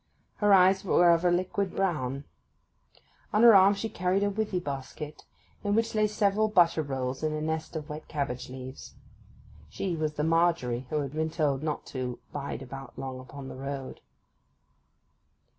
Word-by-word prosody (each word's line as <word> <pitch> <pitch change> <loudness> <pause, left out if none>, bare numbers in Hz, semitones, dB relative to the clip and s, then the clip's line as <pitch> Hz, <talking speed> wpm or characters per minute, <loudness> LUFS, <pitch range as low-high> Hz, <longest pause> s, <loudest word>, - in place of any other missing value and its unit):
Her 205 -1 +3
eyes 190 0 +6
were 175 -2 +5
of 170 0 +3
a 180 - +4
liquid 185 +2 -1
brown. 140 -8 -1 1.1
On 215 +1 +3
her 235 -1 +10
arm 195 +1 +7
she 200 +3 -3
carried 185 0 0
a 205 - +1
withy 205 -2 -1
basket, 145 0 -6 0.4
in 205 0 +1
which 225 0 +1
lay 215 -1 +3
several 210 0 +2
butter 175 -6 +4
rolls 130 -2 -3
in 155 -1 0
a 155 - -2
nest 160 +1 -3
of 155 -2 -4
wet 155 0 -7
cabbage 140 -5 -3
leaves. 130 +1 -9 0.7
She 185 -3 -3
was 155 -1 -1
the 150 - -2
'Margery' 160 -7 +1
who 150 -1 0
had 140 -1 -5
been 160 +1 -1
told 145 -4 0
not 155 -1 -3
to 125 -2 -3 0.2
'bide 140 -1 -4
about 135 0 -9
long 130 -1 -5
upon 135 +1 -9
the - - -8
road. 135 0 -6
155 Hz, 170 wpm, -28 LUFS, 135-190 Hz, 1.1 s, her